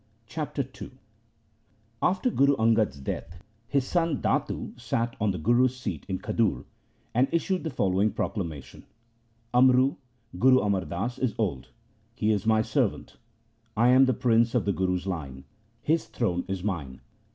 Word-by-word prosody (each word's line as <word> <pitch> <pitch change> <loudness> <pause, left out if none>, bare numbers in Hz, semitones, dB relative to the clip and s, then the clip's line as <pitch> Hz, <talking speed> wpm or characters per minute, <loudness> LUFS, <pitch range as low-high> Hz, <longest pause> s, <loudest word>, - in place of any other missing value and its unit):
Chapter 145 0 -4
II - - -8 1.1
After 195 +7 +1
Guru 140 -4 +3
Angad's 110 - +2
death, 85 +5 -6 0.2
his 140 0 +1
son 165 -2 0
Datu - - -1
sat 115 0 -2
on 105 - +2
the 95 - -1
Guru's 120 +9 +2
seat 125 - -5
in 95 - -1
Khadur, 110 0 -1 0.5
and 125 +3 +3
issued 185 +2 0
the 160 - -2
following 100 -4 +1
proclamation: 85 - -5 0.3
' 115 0 -40
Amru 130 +2 +4 0.4
(Guru 130 +1 +6
Amar 100 -4 0
Das) 110 +11 -4
is 125 -5 -1
old. 90 - -2 0.5
He 110 -2 +1
is 105 0 -1
my 110 -1 +4
servant. - - -1 0.6
I 120 +2 +5
am 130 +1 +6
prince 120 -1 +2
of 120 - +1
the 100 - +1
Guru's 90 -1 -1
line. 70 -8 -5 0.4
His 160 +2 +1
throne 90 -7 -1
is 95 -2 -4
mine.' 75 -11 -4
115 Hz, 150 wpm, -27 LUFS, 95-130 Hz, 1.1 s, Guru